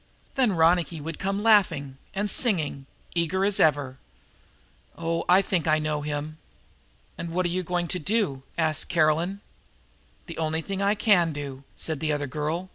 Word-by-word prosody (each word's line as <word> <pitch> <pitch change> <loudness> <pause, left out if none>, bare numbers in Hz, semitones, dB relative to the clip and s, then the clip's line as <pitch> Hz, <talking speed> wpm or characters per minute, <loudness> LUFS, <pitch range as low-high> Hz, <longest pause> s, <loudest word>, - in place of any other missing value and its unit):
Then 255 -7 +2
Ronicky 165 0 +2
would 160 +2 -7
come 195 +2 -2
laughing 165 -12 +3 0.2
and 205 +2 -1
singing, 160 - +4 0.3
eager 175 +3 0
as 205 -1 +1
ever. 145 -4 +2 1.0
Oh, 165 0 -2
I 185 +2 +6
think 175 -5 -1
I 155 0 +4
know 155 -1 -2
him!" 150 +1 -5 0.8
"And 170 - -4
what 180 +2 -1
are - - +1
you 185 - -1
going 175 0 -2
to 180 - -1
do?" 190 -6 0 0.2
asked 155 -2 0
Caroline. 165 +4 +1 0.8
"The 165 - -8
only 160 0 -1
thing 195 +2 -4
I 200 +1 +2
can 195 -6 +3
do," 140 -2 -7
said 160 -3 -2
the 155 -1 -1
other 145 -1 -1
girl. 155 +6 -3
165 Hz, 165 wpm, -25 LUFS, 150-190 Hz, 1.0 s, I